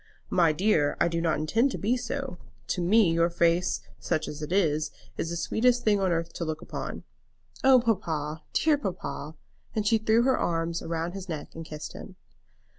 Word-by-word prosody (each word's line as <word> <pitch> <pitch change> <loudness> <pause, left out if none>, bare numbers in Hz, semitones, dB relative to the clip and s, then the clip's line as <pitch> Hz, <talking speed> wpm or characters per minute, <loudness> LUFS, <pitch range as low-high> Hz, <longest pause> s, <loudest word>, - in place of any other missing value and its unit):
"My 170 -3 +4
dear, 155 -3 +2
I - - +4
do 165 0 -1
not 165 -2 +1
intend 225 - +2
to - - -3
be 225 +5 +1
so. 265 -6 -4 0.3
To 180 - 0
me 190 +1 +4
your 170 +1 +3
face, 170 +1 +2 0.2
such 155 - -1
as 150 +1 -6
it 150 +2 -5
is, 155 -5 +2 0.3
is 165 - -3
the 170 - -3
sweetest 245 +8 +2
thing 210 -2 +3
on 190 -2 +1
earth 165 0 -1
to - - -4
look 155 -1 -3
upon." - - -6 0.6
"Oh, 265 -1 +7
papa; 160 -10 -1
dear 305 -2 +3
papa!" 170 - -5 0.4
and 215 -1 0
she 225 +1 +4
threw 220 +2 +3
her 260 +1 +2
arms 165 0 -1
round 165 +1 -3
his 195 -1 -7
neck 155 -3 -5
and 165 - -7
kissed 155 -1 -7
him. - - -10
170 Hz, 190 wpm, -27 LUFS, 160-220 Hz, 0.6 s, Oh